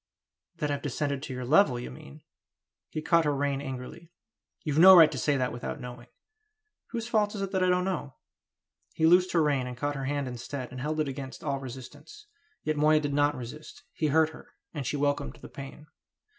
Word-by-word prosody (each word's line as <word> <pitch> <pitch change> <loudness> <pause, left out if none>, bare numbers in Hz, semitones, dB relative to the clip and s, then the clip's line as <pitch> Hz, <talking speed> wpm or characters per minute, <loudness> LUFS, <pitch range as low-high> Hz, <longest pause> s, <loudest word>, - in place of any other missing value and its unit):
"That 150 -1 -2
I've 140 -1 -2
descended 140 0 -2
to 135 - -6
your 125 0 -5
level, 140 -2 +4
you 120 - -7
mean!" 70 +1 -13 0.7
He 155 - -5
caught 170 0 +4
her 145 -1 +1
rein 140 0 -1
angrily. 135 +4 -7 0.5
"You've 155 -2 0
no 190 +2 +10
right 160 -3 +8
to - - -5
say 145 -2 +1
that 125 -2 -1
without 120 - -5
knowing!" 125 0 -9 0.8
"Whose 230 -1 -4
fault 215 -2 +1
is 195 - -3
it 195 - -4
that 190 -1 0
I 185 - +3
don't 180 0 +2
know?" 170 -8 -3 0.8
He 160 - +2
loosed 180 +2 +5
her 165 -2 +4
rein 140 -4 +1
and 125 -1 -7
caught 145 +2 -1
her 135 -1 -4
hand 145 0 -1
instead, 125 +1 -6
and 125 - -7
held 155 +3 -2
it 150 - -1
against 135 0 -7
all 135 - -1
resistance. 135 - -10 0.4
Yet 155 0 -1
Moya 155 +1 +4
did 145 -2 -2
not 145 +1 +2
resist. 150 - -9
He 155 - 0
hurt 160 +2 +3
her, 160 - -14 0.2
and 145 -5 -4
she 145 - -1
welcomed 145 0 -1
the - - -12
pain. 140 +2 -10
145 Hz, 210 wpm, -28 LUFS, 130-160 Hz, 0.8 s, no